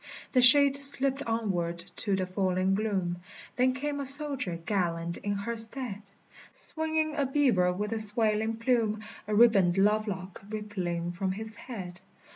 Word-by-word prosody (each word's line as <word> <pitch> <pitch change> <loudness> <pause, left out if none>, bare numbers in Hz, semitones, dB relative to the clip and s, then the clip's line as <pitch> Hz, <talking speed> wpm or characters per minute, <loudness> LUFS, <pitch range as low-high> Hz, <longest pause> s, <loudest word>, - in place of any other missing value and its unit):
The 255 - +2
shade 275 +2 +10
slipped 275 -1 +3
onward 190 -7 -3 0.2
to 200 -3 +1
the 190 -1 -3
falling 185 0 -2
gloom; 195 -4 -3 0.4
Then 255 +1 +1
came 285 +2 -5
a 280 - -5
soldier 275 - +3
gallant 170 -4 -3
in 205 - -5
her 215 +4 -5
stead, 225 -2 -1 0.5
Swinging 315 -1 -3
a 285 -3 -1
beaver 250 -11 +1
with 205 +4 -5
a 225 - -4
swaling 215 +1 +2
plume, 225 -2 -2 0.2
A 210 - -2
ribboned 200 -6 +3
love 210 +2 +1
lock 190 -2 -8
rippling 185 -5 -5
from 185 +1 -4
his 220 +2 -9
head. 190 -6 -10
215 Hz, 150 wpm, -27 LUFS, 190-255 Hz, 0.5 s, shade